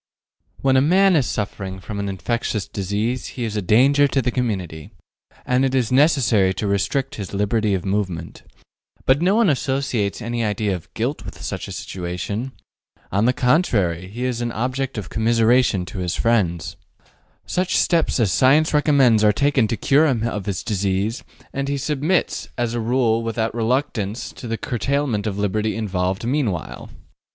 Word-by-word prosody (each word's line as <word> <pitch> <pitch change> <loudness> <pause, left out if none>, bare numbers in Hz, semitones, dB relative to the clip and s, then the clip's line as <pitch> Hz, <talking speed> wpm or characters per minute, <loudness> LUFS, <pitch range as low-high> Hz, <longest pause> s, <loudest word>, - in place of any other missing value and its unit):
When 135 -1 +3
a - - +5
man 185 +5 +4
is 140 -6 +2
suffering 95 -2 -4
from 100 +2 -6
an 100 0 -2
infectious 105 +1 -2
disease 105 +6 -2
he 125 - -2
is 110 -2 -3
a 105 - 0
danger 135 +9 +4
to 140 - 0
the 125 -1 0
community, 95 - -3 0.6
and 125 +1 +2
it 135 0 +1
is 125 -3 +1
necessary 125 - +3
to 105 - -3
restrict 130 +8 0
his 100 0 -6
liberty 105 0 +1
of 95 - -4
movement. 95 -4 -3 0.6
But 135 +3 +3
no 185 +4 +3
one 230 -2 +4
associates 130 - 0
any 120 0 -2
idea 105 -1 0
of 85 - -10
guilt - - -2
with - - -9
such - - -4
a - - -8
situation. 95 +7 -4 0.6
On 100 +4 +2
the 125 - +4
contrary, 115 - +1
he 115 +6 -6
is 125 -2 -2
an 120 0 -2
object 130 +2 -2
of 105 - -5
commiseration 115 -2 +2
to 95 - -7
his 90 -2 -2
friends. 95 -8 0 0.7
Such 185 0 0
steps 165 -5 +2
as 110 -6 +2
science 140 - +4
recommends 140 -7 +4
are 105 - +6
taken 135 0 +2
to 115 0 -2
cure 150 +3 +3
him 120 -5 0
of 105 -3 -4
his 95 -4 -2
disease, 100 +2 -1 0.3
and 140 0 -2
he 140 0 -1
submits 150 +5 -1
as 120 -1 -1
a 120 - -1
rule 115 -1 +1
without 115 0 -2
reluctance 115 -2 -1
to 120 - -9
the 115 0 -2
curtailment 125 -3 -1
of 100 -2 -3
liberty 105 +2 -1
involved 95 -1 -2
meanwhile. 120 - -2
115 Hz, 170 wpm, -21 LUFS, 100-130 Hz, 0.7 s, are